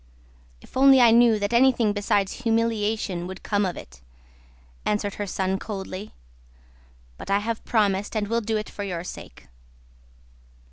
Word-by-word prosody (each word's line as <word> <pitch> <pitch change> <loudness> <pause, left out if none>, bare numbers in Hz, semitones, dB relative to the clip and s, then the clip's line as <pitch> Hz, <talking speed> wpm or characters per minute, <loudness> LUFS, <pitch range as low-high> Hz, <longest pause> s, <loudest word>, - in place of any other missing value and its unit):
"If - - -18
only 270 0 +6
I 240 -2 +6
knew 235 -1 +5
that 205 +2 -2
anything 235 -3 +3
besides 205 +1 -1
humiliation 220 -5 -1
would 190 0 -9
come 205 -2 0
of 180 - -5
it..." - - -12 0.8
answered 210 -1 -1
her 205 - -3
son 190 0 -1
coldly. 195 -1 -7 1.0
"But - - -9
I 200 - +3
have 220 +2 -3
promised 205 -2 0
and 210 -1 -1
will 230 +2 0
do 220 0 -1
it 215 - -4
for 205 - -7
your 175 -4 -4
sake." 120 - -10
210 Hz, 150 wpm, -24 LUFS, 195-230 Hz, 1.0 s, only